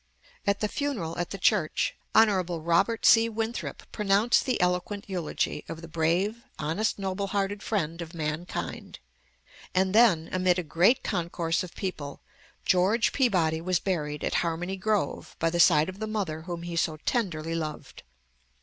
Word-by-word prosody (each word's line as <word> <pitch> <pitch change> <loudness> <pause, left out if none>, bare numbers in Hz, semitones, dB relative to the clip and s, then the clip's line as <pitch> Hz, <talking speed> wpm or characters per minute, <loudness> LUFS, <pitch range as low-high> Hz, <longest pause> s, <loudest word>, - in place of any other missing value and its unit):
At 200 0 +1
the 210 - +2
funeral, 215 - -3
at 175 - -2
the 195 - -5
church, 190 -5 +1 0.2
Hon. 225 - +8 0.3
Robert 170 +8 +1
C. 230 0 +6
Winthrop 225 +1 -4
pronounced 210 +5 +2
the 255 - +1
eloquent 180 +3 0
eulogy, 180 -5 -2
of 165 0 -7
the - - -7
"brave, 170 +8 0 0.2
honest, 180 +9 -1
noble 195 0 -2
hearted 200 0 -1
friend 170 -6 -2
of 170 +1 -8
mankind," 155 +2 -4 0.8
and 190 +1 +2
then, 210 -8 +5
amid 185 -1 +2
a 180 - -1
great 175 - +3
concourse 170 -3 -1
of 180 - -8
people, 155 -8 -5 0.5
George 190 +6 +3
Peabody 175 - +2
was 185 +1 +1
buried 150 -6 -2
at - - -1
Harmony 175 +3 -2
Grove, 195 -5 -1
by 165 0 +1
the 175 - -1
side 155 -2 +6
of 185 +1 -7
the 220 - -3
mother 195 -8 -3
whom 170 0 -6
he 170 -1 -5
so 165 -2 0
tenderly 165 -9 -1
loved. 155 -2 -5
180 Hz, 160 wpm, -27 LUFS, 165-205 Hz, 0.8 s, Hon